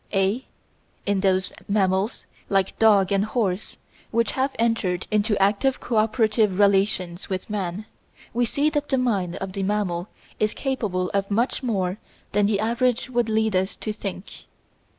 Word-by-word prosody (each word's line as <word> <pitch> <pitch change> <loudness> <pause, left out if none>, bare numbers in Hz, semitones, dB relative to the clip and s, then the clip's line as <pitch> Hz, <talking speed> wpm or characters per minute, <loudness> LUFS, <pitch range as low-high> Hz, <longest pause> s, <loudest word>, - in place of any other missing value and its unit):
(a) 195 +6 +1 0.6
In 200 -1 +1
those 190 -1 +1
mammals, 195 +1 +1 0.2
like 195 -1 +1
dog 205 -4 +5
and 200 0 +3
horse, 215 -3 -1 0.3
which 230 -1 +1
have 265 +1 0
entered 225 -6 0
into 210 0 +2
active 205 +7 +2
cooperative 215 -3 +2
relations 195 -3 +2
with 190 +2 -4
man, 200 0 -3 0.5
we 240 +2 +1
see 280 +5 +1
that 295 -1 -1
the 265 - +2
mind 200 -9 0
of 190 0 -5
the 195 - -3
mammal 190 -3 -1 0.3
is 215 0 +1
capable 205 -10 -1
of 200 0 0
much 230 +8 0
more 200 -6 -1 0.3
than 205 0 +3
the 205 -1 +1
average 240 +3 0
would 240 -2 +1
lead 220 -2 +1
us 190 +2 0
to 215 - -4
think. 195 -2 -7
205 Hz, 150 wpm, -24 LUFS, 190-225 Hz, 0.6 s, dog